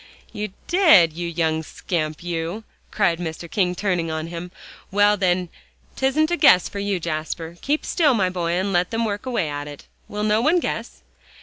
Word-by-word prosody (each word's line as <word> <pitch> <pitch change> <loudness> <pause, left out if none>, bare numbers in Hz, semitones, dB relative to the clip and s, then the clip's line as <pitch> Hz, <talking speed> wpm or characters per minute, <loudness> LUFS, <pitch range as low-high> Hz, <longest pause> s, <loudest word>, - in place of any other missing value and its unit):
"You 210 -1 -4
did, 315 - +5
you 170 +1 -4
young 160 -1 0
scamp, 155 -1 -4
you!" 175 +4 -3 0.3
cried 175 -5 +1
Mr. 170 0 -5
King, 180 -1 0
turning 180 -4 -1
on 160 0 -3
him. 170 +1 -6 0.4
"Well, 205 +1 +4
then, 180 -2 0 0.5
'tisn't 300 +5 +1
a 345 - +1
guess 180 - +6
for 200 - -6
you, 200 -2 -1
Jasper. 160 0 -4
Keep 295 +2 -1
still, 295 -7 +3
my 185 -4 +1
boy, 170 -2 -1
and 190 +2 0
let 175 +1 +2
them 230 0 -1
work 210 +4 -4
away 240 -10 0
at 145 0 -5
it. 145 -1 -10 0.2
Will 210 0 -4
no 215 +1 +2
one 325 +8 +3
guess?" - - -5
180 Hz, 185 wpm, -22 LUFS, 165-210 Hz, 0.5 s, guess